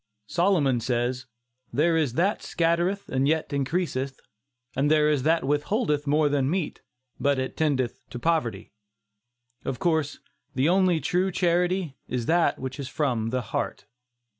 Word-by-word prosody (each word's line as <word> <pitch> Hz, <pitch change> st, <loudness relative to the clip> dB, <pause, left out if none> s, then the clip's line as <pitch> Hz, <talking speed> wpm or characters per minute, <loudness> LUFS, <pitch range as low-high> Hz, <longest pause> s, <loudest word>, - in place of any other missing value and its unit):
Solomon 165 Hz, -, +2 dB
says: 125 Hz, +2 st, -1 dB, 0.4 s
"There 165 Hz, +3 st, +2 dB
is 150 Hz, -7 st, +1 dB
that 190 Hz, +9 st, +1 dB
scattereth 170 Hz, +4 st, 0 dB
and 135 Hz, +1 st, +1 dB
yet 160 Hz, -1 st, 0 dB
increaseth; 140 Hz, -2 st, -1 dB, 0.6 s
and 140 Hz, +2 st, +2 dB
there 155 Hz, -1 st, +4 dB
is 145 Hz, -3 st, +1 dB
that 160 Hz, +4 st, +2 dB
withholdeth 150 Hz, -, 0 dB
more 150 Hz, +1 st, +3 dB
than 140 Hz, -2 st, +1 dB
meet, 175 Hz, -1 st, -2 dB, 0.4 s
but 140 Hz, -1 st, +2 dB
it 130 Hz, 0 st, -3 dB
tendeth 135 Hz, -6 st, 0 dB
to -, -, -7 dB
poverty." 120 Hz, -, -1 dB, 0.9 s
Of 130 Hz, -, -3 dB
course 160 Hz, -3 st, 0 dB, 0.4 s
the 135 Hz, +3 st, +2 dB
only 180 Hz, -2 st, +3 dB
true 185 Hz, +2 st, +1 dB
charity 175 Hz, -3 st, 0 dB
is 125 Hz, -2 st, -2 dB
that 170 Hz, +4 st, +2 dB
which 130 Hz, +1 st, -6 dB
is 140 Hz, -, -4 dB
from 130 Hz, -6 st, -1 dB
the 130 Hz, +1 st, -1 dB
heart. -, -, -2 dB
150 Hz, 145 wpm, -26 LUFS, 130-170 Hz, 0.9 s, there